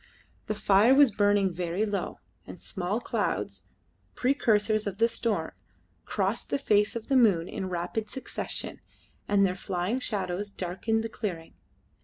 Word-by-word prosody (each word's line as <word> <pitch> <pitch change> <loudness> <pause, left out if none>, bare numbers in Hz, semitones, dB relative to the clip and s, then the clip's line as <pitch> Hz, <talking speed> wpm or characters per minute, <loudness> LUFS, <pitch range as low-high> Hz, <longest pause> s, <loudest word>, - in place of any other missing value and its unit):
The 215 - -1
fire 205 +5 +5
was 280 -3 +6
burning 205 -2 +2
very 175 +4 -1
low, 205 -2 -3 0.3
and - - -9
small 195 +2 -3
clouds - - -2 0.5
precursors 215 -5 +2
of 195 -1 -4
the 230 - +4
storm 230 -1 -1 0.5
crossed - - -1
the - - +1
face 210 -6 +2
of 230 -1 -5
the 275 - +2
moon 200 -9 +4
in 190 - -4
rapid 180 +5 -3
succession, 265 - -5 0.5
and 200 -1 +4
their 180 - +1
flying 185 +5 -2
shadows 205 -4 -2
darkened 200 +4 -2
the 225 - -3
clearing. 180 -8 -5
205 Hz, 145 wpm, -28 LUFS, 185-225 Hz, 0.5 s, was